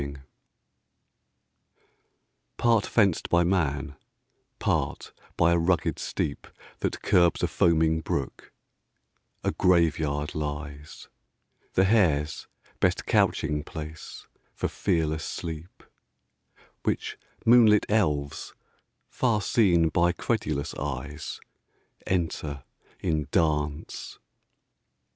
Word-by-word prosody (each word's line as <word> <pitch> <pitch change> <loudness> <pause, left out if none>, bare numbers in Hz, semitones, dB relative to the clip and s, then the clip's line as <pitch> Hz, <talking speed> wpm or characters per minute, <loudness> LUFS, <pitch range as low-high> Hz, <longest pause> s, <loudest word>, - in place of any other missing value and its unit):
] - - -46
Part 115 -3 +3
fenced 100 -7 +2
by 85 0 +4
man, 75 -6 0 0.6
part - - -1 0.2
by 85 - +4
a 85 - +3
rugged 85 +1 +1
steep 70 - -3 0.3
That - - -3
curbs 85 -1 +3
a - - +3
foaming 80 -1 +2
brook, - - -4 0.9
a - - +1
Grave 85 -4 +3
yard 75 -1 -2
lies; 75 -1 -6 0.7
The 95 - +4
hare's 85 -8 +2 0.3
best - - +1
couching 75 0 +1
place 80 0 -8 0.3
for - - -1
fearless 80 -5 -1
sleep; 85 +1 -7 1.0
Which - - -2 0.3
moonlit 115 -3 +6
elves, 75 -10 0 0.5
far 115 -4 +1
seen 90 -6 +3
by 85 +2 +2
credulous 75 - -2
eyes, 75 +2 -5 0.7
Enter 80 -6 -2 0.4
in 75 -3 -1
dance. 75 -3 -1
80 Hz, 90 wpm, -27 LUFS, 75-90 Hz, 1.0 s, moonlit